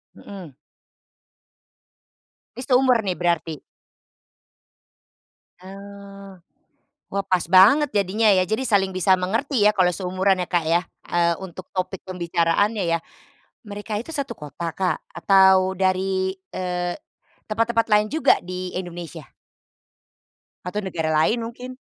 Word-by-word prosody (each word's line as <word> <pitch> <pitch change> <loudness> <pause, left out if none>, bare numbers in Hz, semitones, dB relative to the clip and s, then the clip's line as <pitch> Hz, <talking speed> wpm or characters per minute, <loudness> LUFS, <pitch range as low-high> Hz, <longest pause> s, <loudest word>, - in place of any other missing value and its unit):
Mmm. 185 -7 -11 2.1
Ini - - -5
seumur 255 -2 +4
nih 185 -3 -2
berarti. 170 -3 -2 2.0
Mmm, 200 0 -12 0.7
wah 200 0 -1
pas 185 -2 +1
banget 215 +11 +6
jadinya 205 +2 +1
ya, 185 -1 +3
jadi 220 +5 -1
saling 200 -5 +2
bisa 185 +1 +3
mengerti 225 +6 -1
ya - - +6
kalau 180 -1 +3
seumuran 185 +1 0
ya 180 - -3
Kak 175 -2 0
ya, 165 +2 +2 0.3
eee, 170 -1 +2
untuk 185 0 -10
topik 185 0 -3
pembicaraannya 180 +4 0
ya, - - -4 0.7
mereka 205 +1 -5
itu 245 - -9
satu 280 -2 -3
kota 150 +3 -7
Kak 185 +1 -1 0.2
atau 190 +1 +4
dari, 190 0 0 0.2
eee, 180 -1 -3 0.5
tempat-tempat 230 +1 0
lain 210 0 +4
juga 315 - +3
di 185 0 -6
Indonesia? 175 -3 -7 1.4
Atau 195 +3 -3
negara 165 -4 -2
lain 155 +10 +2
mungkin? 245 +2 -7
190 Hz, 120 wpm, -22 LUFS, 180-210 Hz, 2.1 s, banget